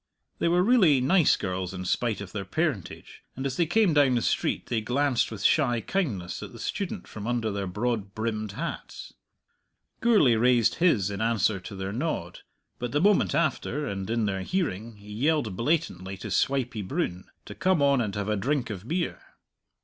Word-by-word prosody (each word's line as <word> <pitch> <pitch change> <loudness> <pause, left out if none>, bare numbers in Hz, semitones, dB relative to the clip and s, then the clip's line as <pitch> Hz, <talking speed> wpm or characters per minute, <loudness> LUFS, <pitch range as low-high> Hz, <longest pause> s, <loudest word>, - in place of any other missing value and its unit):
They - - +1
were 175 +1 +3
really 190 - +5
nice 165 +5 +4
girls, 95 -1 -3
in 90 0 -5
spite 110 +3 0
of 95 -3 -8
their 100 0 -4
parentage, 125 - -3
and 135 - -5
as 135 -1 -1
they 170 +1 +1
came 200 0 +3
down 140 -4 +4
the 120 - 0
street - - 0
they 115 -2 -1
glanced 130 +3 +1
with 110 -3 -7
shy 125 -6 +3
kindness 110 - -2
at - - -8
the - - -10
student - - -4
from 105 0 -7
under 120 -3 0
their 100 -1 -3
broad 105 0 -2
brimmed 110 -2 -3
hats. - - -6 0.9
Gourlay 210 - +5
raised 120 -1 +3
his 110 - +3
in 100 +1 -4
answer 110 -3 +1
to 100 +2 -9
their 95 +1 -4
nod. 115 - -3 0.4
But 120 +1 -4
the 145 - +2
moment 205 +4 +3
after, 150 -2 0
and 95 -4 -4
in 115 -1 +1
their 95 -2 -1
hearing, 115 - -2
he 105 0 -11
yelled 130 - +1
blatantly 105 - -1
to 95 - -7
Swipey 125 -5 0
Broon 90 -1 -3 0.2
to - - -8
come 185 -3 +1
on 140 -2 +4
and 105 -3 -3
have 100 0 -2
a 105 - +1
drink 130 +3 -1
of 100 +2 -7
beer. 170 +3 -2
115 Hz, 190 wpm, -27 LUFS, 100-145 Hz, 0.9 s, really